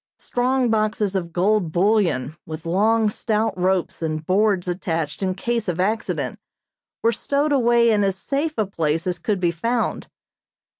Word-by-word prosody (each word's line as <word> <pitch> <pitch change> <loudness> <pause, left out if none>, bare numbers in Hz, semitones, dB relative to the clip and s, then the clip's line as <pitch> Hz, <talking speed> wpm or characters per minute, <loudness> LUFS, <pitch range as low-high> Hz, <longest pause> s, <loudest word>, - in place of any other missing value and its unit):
Strong 250 0 0
boxes 215 -2 0
of 170 -3 -2
gold 185 0 +1
bullion, 175 - +1
with 155 +1 -8
long, 215 +6 +2
stout 215 +1 -1
ropes 185 -1 0
and 155 -1 -3
boards 195 0 +2
attached 165 -3 -2
in 185 -1 0
case 235 +2 -2
of 180 -1 -2
accident, 210 +4 -1 0.6
were 230 - +4
stowed 285 +5 0
away 235 -3 +4
in 210 -2 +2
as 195 -1 +1
safe 285 +10 -2
a 215 - +2
place 165 -4 -1
as 180 -2 -2
could 200 +3 -1
be 175 -2 +2
found. 230 +8 -2
200 Hz, 155 wpm, -22 LUFS, 175-225 Hz, 0.6 s, were